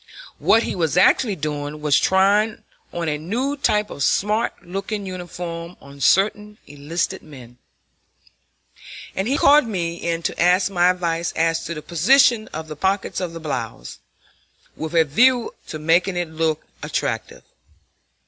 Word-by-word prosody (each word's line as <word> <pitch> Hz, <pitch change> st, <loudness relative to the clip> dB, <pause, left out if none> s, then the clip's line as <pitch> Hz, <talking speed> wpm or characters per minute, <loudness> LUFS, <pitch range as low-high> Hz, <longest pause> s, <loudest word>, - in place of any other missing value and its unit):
What 225 Hz, -, +4 dB
he -, -, -3 dB
was 170 Hz, -2 st, 0 dB
actually 205 Hz, +3 st, +4 dB
doing 150 Hz, -1 st, -4 dB
was 150 Hz, -1 st, +3 dB
trying 200 Hz, +3 st, +2 dB, 0.3 s
on 170 Hz, -1 st, -3 dB
a 150 Hz, -1 st, -1 dB
new 240 Hz, -, -2 dB
type 210 Hz, -7 st, 0 dB
of -, -, -8 dB
smart 210 Hz, +9 st, 0 dB
looking 195 Hz, +3 st, -4 dB
uniform 175 Hz, -2 st, -7 dB
on 140 Hz, 0 st, -14 dB
certain 210 Hz, +4 st, +2 dB
enlisted 155 Hz, +6 st, -3 dB
men; 125 Hz, -5 st, -14 dB, 1.6 s
and 190 Hz, +2 st, -1 dB
he 275 Hz, +3 st, +1 dB
called 290 Hz, -3 st, +5 dB
me 170 Hz, -5 st, -3 dB
in 170 Hz, -1 st, -3 dB
to -, -, -2 dB
ask 180 Hz, +3 st, +3 dB
my 180 Hz, -1 st, +3 dB
advice 170 Hz, -2 st, -1 dB
as 165 Hz, 0 st, 0 dB
to 170 Hz, +1 st, -4 dB
the 150 Hz, -, -7 dB
position 220 Hz, -, +3 dB
of 160 Hz, +1 st, -7 dB
the 155 Hz, -, -7 dB
pockets 190 Hz, +6 st, -1 dB
in 180 Hz, -2 st, -3 dB
the 165 Hz, -, -7 dB
blouse, 145 Hz, -, -5 dB, 0.8 s
with 160 Hz, +2 st, -5 dB
a 165 Hz, -1 st, +5 dB
view 240 Hz, -, +3 dB
to 155 Hz, -, -5 dB
making 170 Hz, +4 st, +1 dB
it 175 Hz, -2 st, -3 dB
look 160 Hz, -1 st, -1 dB, 0.2 s
attractive. -, -, -3 dB
175 Hz, 150 wpm, -21 LUFS, 160-205 Hz, 1.6 s, called